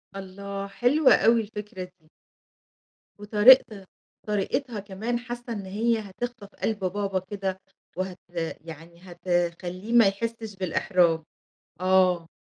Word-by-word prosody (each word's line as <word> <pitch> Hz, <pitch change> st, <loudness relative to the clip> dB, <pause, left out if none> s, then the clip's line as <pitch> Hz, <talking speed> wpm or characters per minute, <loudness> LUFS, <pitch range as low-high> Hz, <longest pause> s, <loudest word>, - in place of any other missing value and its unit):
الله، 195 Hz, +1 st, -6 dB
حلوة 255 Hz, +8 st, +4 dB
أوي 230 Hz, +2 st, +4 dB
الفكرة 210 Hz, -3 st, -7 dB
دي. 170 Hz, -3 st, -16 dB, 1.1 s
وطريقت 210 Hz, -1 st, +5 dB, 0.4 s
طريقتها 210 Hz, +3 st, -1 dB
كمان 215 Hz, +5 st, -3 dB
حاسّة 240 Hz, -1 st, -6 dB
إن 200 Hz, -3 st, -6 dB
هي 225 Hz, +4 st, 0 dB
هتخطف 210 Hz, +1 st, -6 dB, 0.2 s
قلب 215 Hz, -2 st, 0 dB
بابا 195 Hz, 0 st, -1 dB
كده 190 Hz, 0 st, -4 dB, 0.4 s
وهت 185 Hz, -1 st, -4 dB, 0.4 s
يعني 165 Hz, +1 st, -11 dB
هتخلّيه 175 Hz, +3 st, -3 dB
ما 230 Hz, -4 st, +7 dB
يحسّش 220 Hz, +1 st, -3 dB
بالإحراج، 175 Hz, -2 st, +1 dB, 0.6 s
آه. 185 Hz, -2 st, +3 dB
195 Hz, 105 wpm, -26 LUFS, 185-225 Hz, 1.1 s, ما